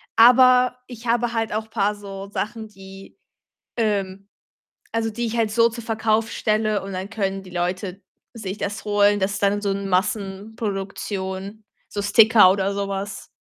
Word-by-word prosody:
aber 250 +1 +6
ich 240 -1 -10
habe 235 0 +1
halt 225 -1 -1
auch 220 +1 -4
paar 210 -1 +1
so 195 -1 -8
Sachen, 220 +2 -4
die 195 -1 -13 0.6
ähm, 195 -3 -1 0.6
also, 225 0 -1
die 235 +2 -3
ich 230 +1 -3
halt 220 -2 +1
so 230 0 +4
zur 230 0 -8
Verkauf 220 0 0
stelle 215 -1 0
und 195 0 -7
dann 185 +2 -4
können 195 -3 -2
die 185 - -12
Leute 180 +2 -3 0.3
sich 210 -3 -6
das 205 +2 -4
holen. 205 -1 +3
Das 200 +2 -1
dann 200 +1 +1
so 200 - -1
'n 200 0 -2
Massenproduktion, 195 0 -3 0.2
so 205 - -4
Sticker 215 -1 +6
oder 195 +1 0
so 200 0 -2
was. 195 0 -5
205 Hz, 160 wpm, -22 LUFS, 195-225 Hz, 0.6 s, aber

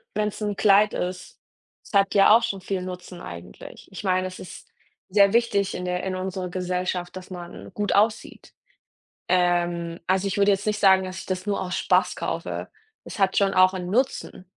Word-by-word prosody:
Wenn's 210 0 -2
'n 205 -1 -2
Kleid 205 +1 +4
ist. 180 0 -5 0.4
Es - - -17
hat 195 0 +3
ja 200 +1 +7
auch 235 - +2
schon 195 -3 -2
viel 190 0 -3
Nutzen 180 -1 -8
eigentlich. 85 0 -11
Ich 190 - -8
meine, 185 -1 +1
es 185 0 -8
ist 185 - -11 0.4
sehr 200 +1 +4
wichtig 205 -4 +1
in 180 - -4
der 180 0 -2
in 190 -1 -2
unserer 185 0 -4
Gesellschaft, 180 0 -3
dass 185 0 -9
man 175 -2 -9
gut 210 -1 -1
aussieht. 215 +2 0 0.7
Ähm, 175 -2 +1
also, 190 +1 +1
ich 195 - -2
würde 200 0 +4
jetzt 195 0 0
nicht 210 0 0
sagen, 190 -2 +5
dass 185 0 -6
ich - - -9
das 185 0 -3
nur 205 -1 -1
aus 185 -1 -3
Spaß - - +2
kaufe. - - -4 0.3
Das - - -9
hat 190 -1 +2
schon 200 -1 +3
auch 185 0 +5
'n 180 -1 -5
Nutzen. 235 -4 -1
185 Hz, 195 wpm, -24 LUFS, 180-200 Hz, 0.7 s, ja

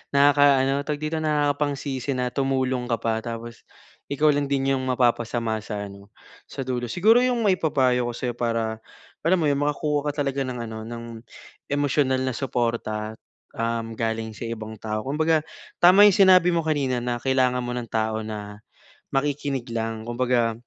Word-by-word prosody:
nakaka-ano, 140 -1 +4
tawag 145 0 -3
dito, 155 +1 -3
nakakapangsisi 145 -2 -1
na 125 -1 -1
tumulong 130 -1 0
ka 115 - +1
pa, 110 -1 -1
tapos 115 -1 -7 0.5
ikaw 150 +2 +2
lang 145 -1 -1
din 135 0 +1
'yong 130 - -3
mapapasama 120 -3 0
sa 105 -2 -5
ano, 100 +1 -14 0.3
sa 135 -1 -7
dulo. 120 -2 -2
Siguro, 225 +7 +4
'yong 240 -4 +1
maipapayo 130 -9 +2
ko - - -10
sa'yo 120 0 -4
para, 115 -2 -2 0.4
alam 180 +3 +3
mo 155 - +1
'yon, 140 - +2
makakuha 145 0 0
ka 145 - -9
talaga 140 -1 0
ng 125 -1 -5
ano, 110 - -7
ng 115 +1 -7 0.7
emosyonal 140 -2 +1
na 130 -2 -2
suporta, 115 -4 -2 0.4
um, 115 0 -2
galing 110 -1 -3
sa - - -8
ibang 110 -1 -5
tao. 110 +2 -4
Kumbaga, 155 +3 +2 0.4
tama 185 +4 +7
'yong 205 - +7
sinabi 185 -1 +6
mo 170 - +1
kanina 145 -6 0
na, 120 0 -2
kailangan 130 -1 +2
mo 120 - -4
ng 120 -1 -4
tao 110 0 -1
na, 105 -1 -7 0.5
makikinig 140 -2 -1
lang. 115 -1 -3
Kumbaga, 120 -1 +1
130 Hz, 165 wpm, -24 LUFS, 115-145 Hz, 0.7 s, tama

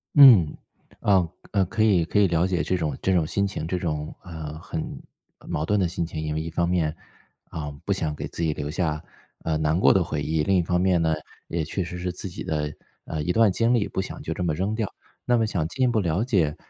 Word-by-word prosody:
嗯， 120 - +8 0.5
呃， 95 -4 +3 0.2
呃 100 -2 +2
可 110 +5 0
以 95 -6 +4
可 105 - +1
以 100 - +5
了 85 0 +2
解 90 -2 0
这 95 - 0
种 80 -3 -2
这 95 - +2
种 85 -4 +3
心 100 +4 +1
情， 95 -5 -4
这 90 - -1
种， 75 -4 -3
呃， 80 -3 -7
很 80 -1 -5 0.4
呃， - - -17
矛 75 - -1
盾 105 +4 +2
的 95 - +2
心 85 0 -2
情。 80 -1 -5
因 75 -1 -2
为 80 - -1
一 80 - -4
方 85 +1 0
面， 85 -3 +1 0.6
嗯， 75 -2 -6
不 100 - +2
想 80 -6 -2
给 - - -5
自 - - -6
己 80 -2 +1
留 75 0 -4
下， 80 -2 -1 0.4
呃， 80 -1 0
难 80 +2 +1
过 - - +6
的 95 - +3
回 75 -2 -3
忆， 80 0 0
另 95 +5 +2
一 - - +4
方 90 +1 +1
面 90 -2 +3
呢， 80 -1 +2 0.3
也 80 -1 -1
确 95 +4 -2
实 90 +1 -6
是 90 +1 -2
自 90 +2 -5
己 85 - -7
的， 75 -1 -2 0.3
呃， 80 - -3
一 90 - 0
段 110 0 +4
经 115 +5 +2
历， 115 -4 +2
不 - - -2
想 95 - -7
就 - - -3
这 - - -3
么 85 -3 +1
扔 95 +7 -1
掉。 110 -5 -2 0.3
那 120 - +3
么 115 - +2
想 90 -7 -1
进 130 +10 -2
一 - - +5
步 115 -3 +2
了 90 +2 +1
解 90 - +1
85 Hz, 275 characters per minute, -25 LUFS, 80-95 Hz, 0.6 s, 嗯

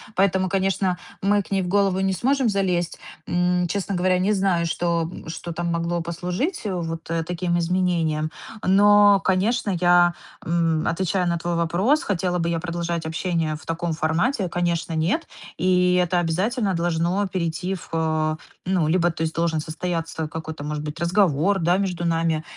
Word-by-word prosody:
Поэтому, 190 -1 +2
конечно, 190 -1 0 0.3
мы 205 +1 +3
к - - -13
ней 195 -1 +2
в - - -4
голову 195 0 +2
не 190 0 +1
сможем 260 +5 +1
залезть. 180 -4 0 0.3
М, 180 0 +1
честно 200 +2 -2
говоря, 180 0 +2
не 200 +3 +2
знаю, 190 -4 +1
что, 170 0 0
м, - - -10
что 170 +1 -6
там 170 +1 -2
могло 170 +1 -1
послужить, 180 - -3
э, 200 - -1
вот, 165 -2 -4
э, 165 -1 0
таким 175 0 -1
изменениям. 170 -3 0 0.3
Но, 205 +1 +6
конечно, 200 +3 +1
я, 175 0 +5 0.3
м, 165 -1 +1
отвечая 185 +1 0
на 170 -1 0
твой 170 +1 -2
вопрос- 180 - +2
хотела 180 -2 -1
бы 170 0 0
я 165 -1 0
продолжать 170 -1 -3
общение 160 -1 -1
в 150 - -12
таком 165 0 -2
формате,- 175 - 0
конечно, 170 -1 -1
нет. 170 - 0 0.3
И 180 -1 +3
это 175 0 +1
обязательно 195 +5 0
должно 175 +3 0
перейти 180 0 -2
в, 180 - -11
э, 155 -1 0 0.3
ну, 180 -4 +1
либо 175 +1 +3
то 160 - -8
есть 160 - -2
должен 165 -1 0
состояться 165 0 -3
какой-то, 160 -1 -6
может 150 0 -4
быть, 150 +2 -6
разговор, 180 +1 +2
да, 175 +2 +2
между 180 -3 -2
нами, 165 -1 +1
175 Hz, 170 wpm, -23 LUFS, 165-190 Hz, 0.3 s, Но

